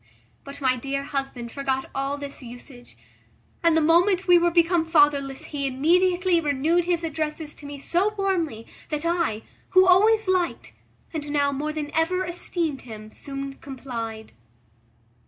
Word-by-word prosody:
But 280 Hz, 0 st, -10 dB
my 260 Hz, -2 st, +2 dB
dear 275 Hz, +2 st, -3 dB
husband 270 Hz, -4 st, -4 dB
forgot 265 Hz, -1 st, -2 dB
all 275 Hz, +1 st, -2 dB
this 285 Hz, 0 st, -8 dB
usage, 245 Hz, 0 st, -12 dB, 0.6 s
and 335 Hz, -2 st, +4 dB
the -, -, +4 dB
moment 350 Hz, +4 st, +3 dB
we 355 Hz, -1 st, +7 dB
were 345 Hz, 0 st, +3 dB
become 340 Hz, 0 st, +3 dB
fatherless 290 Hz, -4 st, +2 dB
he 280 Hz, -1 st, -1 dB
immediately 350 Hz, +6 st, +2 dB
renewed 310 Hz, +4 st, +1 dB
his 345 Hz, -1 st, 0 dB
addresses 310 Hz, -1 st, -2 dB
to 290 Hz, -, -11 dB
me 285 Hz, 0 st, -7 dB
so 350 Hz, +8 st, +1 dB
warmly, 335 Hz, -, -1 dB, 0.2 s
that 300 Hz, +1 st, -3 dB
I, 335 Hz, -11 st, 0 dB, 0.3 s
who 375 Hz, -, +8 dB
always 425 Hz, +4 st, +5 dB
liked, 365 Hz, -2 st, -1 dB, 0.4 s
and 295 Hz, -2 st, -4 dB
now 285 Hz, -1 st, +1 dB
more 295 Hz, +2 st, -2 dB
than 300 Hz, -1 st, -5 dB
ever 365 Hz, +4 st, +1 dB
esteemed 340 Hz, -4 st, -3 dB
him, 215 Hz, -2 st, -10 dB
soon 275 Hz, +1 st, -7 dB
complied. 235 Hz, -5 st, -6 dB
295 Hz, 150 wpm, -24 LUFS, 275-345 Hz, 0.6 s, who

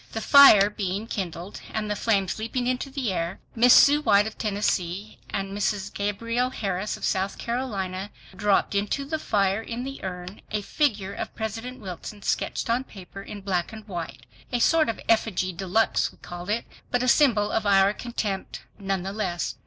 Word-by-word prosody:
The 225 Hz, -, -2 dB
fire 220 Hz, -6 st, +8 dB
being 200 Hz, +1 st, -3 dB
kindled, 185 Hz, -3 st, -5 dB
and 215 Hz, -1 st, -2 dB
the 210 Hz, -, -1 dB
flames 200 Hz, -2 st, 0 dB
leaping 235 Hz, +3 st, -2 dB
into 255 Hz, +2 st, -1 dB
the 265 Hz, -6 st, -2 dB
air, 170 Hz, +1 st, -3 dB
Miss 245 Hz, +2 st, +6 dB
Sue 290 Hz, +1 st, +7 dB
White 210 Hz, -6 st, +4 dB
of 220 Hz, -, -5 dB
Tennessee 200 Hz, -2 st, -2 dB
and 195 Hz, 0 st, -3 dB
Mrs. 205 Hz, -1 st, -1 dB
Gabrielle 230 Hz, +5 st, -1 dB
Harris 200 Hz, -4 st, -3 dB
of -, -, -4 dB
South 190 Hz, 0 st, -1 dB
Carolina 205 Hz, -6 st, -3 dB, 0.3 s
dropped 200 Hz, +1 st, +2 dB
into 205 Hz, +7 st, -1 dB
the 315 Hz, +2 st, -2 dB
fire 200 Hz, -4 st, +1 dB
in 235 Hz, +2 st, -5 dB
the 275 Hz, +1 st, -7 dB
urn 180 Hz, +1 st, -6 dB
a 210 Hz, -1 st, -2 dB
figure 205 Hz, -8 st, 0 dB
of -, -, -6 dB
President 225 Hz, +4 st, -5 dB
Wilson 200 Hz, +1 st, -8 dB
sketched -, -, -1 dB
on 240 Hz, +2 st, +1 dB
paper 195 Hz, -4 st, -11 dB
in 205 Hz, +1 st, -8 dB
black 185 Hz, -2 st, -1 dB
and 220 Hz, -1 st, -10 dB
white—a 135 Hz, -, -6 dB
sort 315 Hz, +2 st, +4 dB
of 225 Hz, -, -3 dB
effigy 195 Hz, -5 st, +1 dB
de 190 Hz, +3 st, -6 dB
luxe, 220 Hz, +5 st, +2 dB
we -, -, -21 dB
called 175 Hz, +2 st, -8 dB
it, 225 Hz, +3 st, 0 dB, 0.2 s
but 245 Hz, 0 st, +1 dB
a -, -, 0 dB
symbol 235 Hz, -7 st, +4 dB
of 215 Hz, -2 st, 0 dB
our 195 Hz, 0 st, +5 dB
contempt 210 Hz, -5 st, -4 dB, 0.2 s
none 195 Hz, -2 st, -2 dB
the 195 Hz, +1 st, -4 dB
less. 175 Hz, -5 st, -2 dB
205 Hz, 180 wpm, -25 LUFS, 190-230 Hz, 0.3 s, fire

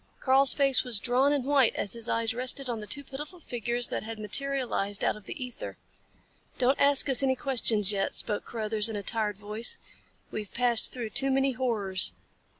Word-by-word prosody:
Karl's 265 Hz, +1 st, +5 dB
face 275 Hz, -2 st, +4 dB
was 245 Hz, -5 st, -1 dB
drawn 255 Hz, +5 st, +1 dB
and 285 Hz, -3 st, 0 dB
white 275 Hz, -4 st, +2 dB
as 200 Hz, -, -1 dB
his 230 Hz, -1 st, -2 dB
eyes 230 Hz, -1 st, 0 dB
rested 255 Hz, +3 st, -1 dB
on 235 Hz, -2 st, -4 dB
the 210 Hz, -, -9 dB
two 285 Hz, +5 st, -2 dB
pitiful 295 Hz, +6 st, -9 dB
figures 240 Hz, -4 st, -4 dB
that -, -, -3 dB
had 225 Hz, 0 st, -8 dB
materialized 215 Hz, -2 st, -2 dB
out -, -, +1 dB
of 210 Hz, -2 st, -14 dB
the 255 Hz, +4 st, -6 dB
ether. 250 Hz, -, -9 dB, 0.8 s
"Don't 260 Hz, +2 st, +1 dB
ask 280 Hz, 0 st, +3 dB
us 270 Hz, -1 st, +5 dB
any 265 Hz, -1 st, +1 dB
questions 230 Hz, -6 st, +2 dB
yet," 195 Hz, -1 st, -1 dB
spoke 210 Hz, -2 st, 0 dB
Carruthers 220 Hz, -1 st, +1 dB
in 220 Hz, -, -5 dB
a 205 Hz, -, -5 dB
tired 210 Hz, -2 st, 0 dB
voice. 210 Hz, +3 st, +1 dB, 0.5 s
"We've 210 Hz, -2 st, -6 dB
passed 240 Hz, -2 st, +2 dB
through 235 Hz, -4 st, -6 dB
too 270 Hz, +4 st, +2 dB
many 270 Hz, 0 st, +1 dB
horrors. 220 Hz, -7 st, 0 dB
240 Hz, 190 wpm, -27 LUFS, 215-270 Hz, 0.8 s, Karl's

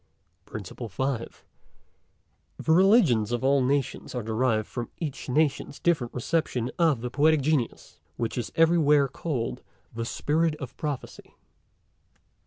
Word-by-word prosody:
PRINCIPLE 110 Hz, +3 st, -7 dB
FIFTH. 130 Hz, +3 st, -3 dB, 1.1 s
The 160 Hz, -, -1 dB
Religions 170 Hz, -, +5 dB
of 120 Hz, +1 st, -1 dB
all 135 Hz, 0 st, +3 dB
Nations 135 Hz, 0 st, -1 dB
are 120 Hz, -, -2 dB
derived 110 Hz, 0 st, 0 dB
from 120 Hz, -2 st, -5 dB
each 150 Hz, -5 st, -5 dB
Nation's 145 Hz, 0 st, 0 dB
different 150 Hz, -9 st, +1 dB
reception 125 Hz, -2 st, -1 dB
of 155 Hz, -8 st, +3 dB
the 125 Hz, 0 st, -4 dB
Poetic 150 Hz, +3 st, +3 dB
Genius, 140 Hz, -4 st, -1 dB, 0.2 s
which 115 Hz, -, -2 dB
is 120 Hz, -, -3 dB
everywhere 155 Hz, -4 st, +4 dB
call'd 135 Hz, -3 st, -3 dB, 0.3 s
the 115 Hz, 0 st, -3 dB
Spirit 155 Hz, +6 st, 0 dB
of 130 Hz, -5 st, -8 dB
Prophecy. 145 Hz, -4 st, -6 dB
135 Hz, 125 wpm, -27 LUFS, 120-155 Hz, 1.1 s, Religions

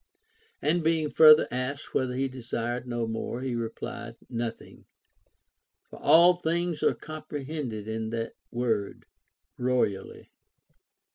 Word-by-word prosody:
And 170 Hz, +1 st, +2 dB
being 160 Hz, -2 st, +1 dB
further 155 Hz, -1 st, +8 dB
asked 130 Hz, +4 st, -4 dB
whether 125 Hz, -1 st, 0 dB
he 135 Hz, +1 st, 0 dB
desired 120 Hz, -1 st, -4 dB
no 120 Hz, -1 st, -1 dB
more, 115 Hz, +2 st, -4 dB
he 130 Hz, -1 st, -2 dB
replied, 115 Hz, 0 st, -5 dB, 0.2 s
Nothing; 115 Hz, -1 st, -5 dB, 1.1 s
for -, -, -10 dB
all 170 Hz, +2 st, +7 dB
things 170 Hz, -1 st, -1 dB
are -, -, +3 dB
comprehended 145 Hz, -7 st, -6 dB
in 110 Hz, 0 st, -3 dB
that 115 Hz, 0 st, -3 dB, 0.2 s
word 115 Hz, -4 st, -2 dB, 0.3 s
" -, -, -56 dB
royally." 125 Hz, -6 st, -1 dB
125 Hz, 120 wpm, -28 LUFS, 115-155 Hz, 1.1 s, further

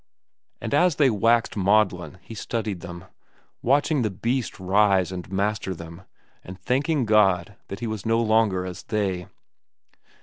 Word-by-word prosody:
And -, -, -5 dB
as 175 Hz, +2 st, +3 dB
they 140 Hz, -4 st, +4 dB
waxed 115 Hz, +2 st, +2 dB
maudlin 95 Hz, -4 st, +1 dB
he -, -, -10 dB
studied 110 Hz, -3 st, -3 dB
them, 85 Hz, +1 st, -9 dB, 0.6 s
watching 145 Hz, +3 st, +2 dB
the 110 Hz, -, 0 dB
beast 115 Hz, +6 st, -3 dB
rise 95 Hz, -1 st, +2 dB
and 90 Hz, 0 st, -7 dB
master 100 Hz, -1 st, -1 dB
them 85 Hz, +2 st, -11 dB, 0.4 s
and 90 Hz, +1 st, -10 dB
thanking 135 Hz, +2 st, 0 dB
God 100 Hz, -3 st, +3 dB
that 100 Hz, -, -7 dB
he -, -, -2 dB
was 110 Hz, -4 st, -4 dB
no 115 Hz, +1 st, +1 dB
longer 110 Hz, -5 st, +2 dB
as 90 Hz, 0 st, -7 dB
they. 95 Hz, -4 st, -2 dB
105 Hz, 145 wpm, -24 LUFS, 95-115 Hz, 0.6 s, they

